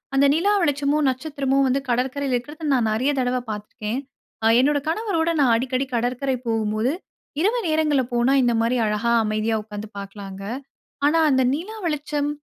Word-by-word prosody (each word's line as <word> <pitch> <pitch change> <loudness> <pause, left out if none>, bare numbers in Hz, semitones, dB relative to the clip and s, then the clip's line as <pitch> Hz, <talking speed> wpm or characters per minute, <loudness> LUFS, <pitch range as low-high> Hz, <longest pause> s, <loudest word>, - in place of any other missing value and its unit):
அந்த 275 +1 +5
நிலா 375 +7 +2
வெளிச்சமும், 290 -1 +1
நட்சத்திரமும் 275 0 0
வந்து 265 +2 +2
கடற்கரையில 260 +2 0
இருக்குறத 295 +6 -5
நான் 240 -4 +2
நெறைய 255 +7 +1
தடவ 255 0 +1
பாத்துருக்கேன். 210 +3 -4 0.5
அ - - +6
என்னோட 285 +3 +3
கணவரோட 335 -2 0
நான் 260 -5 +4
அடிக்கடி 255 +2 -1
கடற்கரை 250 +3 0
போகும்போது, 220 +1 0 0.5
இரவு 440 +7 +2
நேரங்கள்ல 310 -4 +2
போனா 240 +3 +3
இந்த 240 - +2
மாரி 235 +2 +1
அழகா 210 +3 0
அமைதியா 215 +1 0
உக்காந்து 210 0 -8
பாக்கலாங்க. 195 -1 -8 0.6
ஆனா 325 +3 +3
அந்த 260 - +3
நிலா 375 +10 -5
வெளிச்சம், 295 -1 -1
260 Hz, 150 wpm, -23 LUFS, 230-295 Hz, 0.6 s, அ